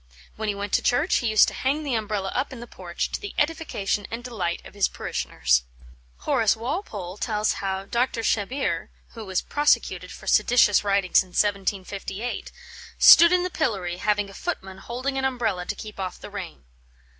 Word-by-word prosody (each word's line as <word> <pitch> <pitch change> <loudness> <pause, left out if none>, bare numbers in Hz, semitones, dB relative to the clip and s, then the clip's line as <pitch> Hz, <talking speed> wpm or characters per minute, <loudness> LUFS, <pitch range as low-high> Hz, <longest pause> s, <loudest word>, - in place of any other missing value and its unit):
When 215 0 -3
he 205 - -1
went 200 0 -5
to - - +4
church, 290 +8 +2
he 240 - -1
used 215 -1 +6
to - - -11
hang 285 +4 -1
the 280 -4 -2
Umbrella 210 -3 -2
up 260 +3 -1
in 260 - -8
the 240 - -7
porch, 175 -6 -5
to - - -4
the 410 - -7
edification 295 -11 -1
and 230 +1 -5
delight 190 -9 -3
of - - -12
his 200 -1 +2
parishioners. 60 0 0 0.6
Horace 220 -3 +2
Walpole 220 - -4
tells 215 -2 0
how 195 0 -2
Dr. 235 +2 0
Shebbeare 240 +6 -1 0.2
(who 225 - -9
was 190 -2 -1
prosecuted 295 0 +1
for - - -11
seditious 220 -5 +4
writings 200 -2 +3
in 190 - -9
1758) 200 +2 -2 0.5
"stood 340 0 +9
in 360 0 +3
the 365 - -3
pillory, 195 - -1
having 205 +1 0
a 195 - -12
footman 190 - -5
holding 260 +6 -3
an - - -3
umbrella 230 -9 -1
to - - -2
keep 215 -2 -9
off 185 -1 -4
the - - -10
rain." 190 -5 -7
210 Hz, 180 wpm, -25 LUFS, 195-250 Hz, 0.6 s, stood